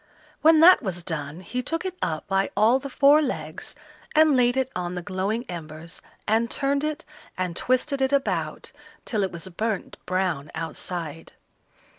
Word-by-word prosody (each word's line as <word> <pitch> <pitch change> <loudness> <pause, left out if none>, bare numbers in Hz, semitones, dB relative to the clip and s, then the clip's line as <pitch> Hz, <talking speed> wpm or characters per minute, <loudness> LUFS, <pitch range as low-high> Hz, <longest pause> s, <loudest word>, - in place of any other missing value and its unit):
When 320 0 +6
that 360 +3 +8
was 180 -7 -4
done, 155 0 -4
he 245 +8 -3
took 330 +7 -3
it 370 -1 -3
up 155 -1 -2
by 195 0 +1
all 225 +5 +5
the 275 +1 -7
four 285 +4 +5
legs 280 - -4 0.4
and 310 -2 +6
laid 245 0 +3
it 265 0 0
on 180 0 -3
the 180 - -4
glowing 195 +7 -2
embers, 165 -1 -8 0.3
and 225 +2 +2
turned 280 +2 0
it 305 -1 -3 0.3
and 180 -2 -2
twisted 265 - +1
it 265 0 +2
about 280 -1 -1 0.3
till 215 -4 -1
it 190 - 0
was 170 +2 -6
burnt 215 +2 -3
brown 185 -6 -1
outside. 165 -1 -5
215 Hz, 165 wpm, -25 LUFS, 175-270 Hz, 0.4 s, that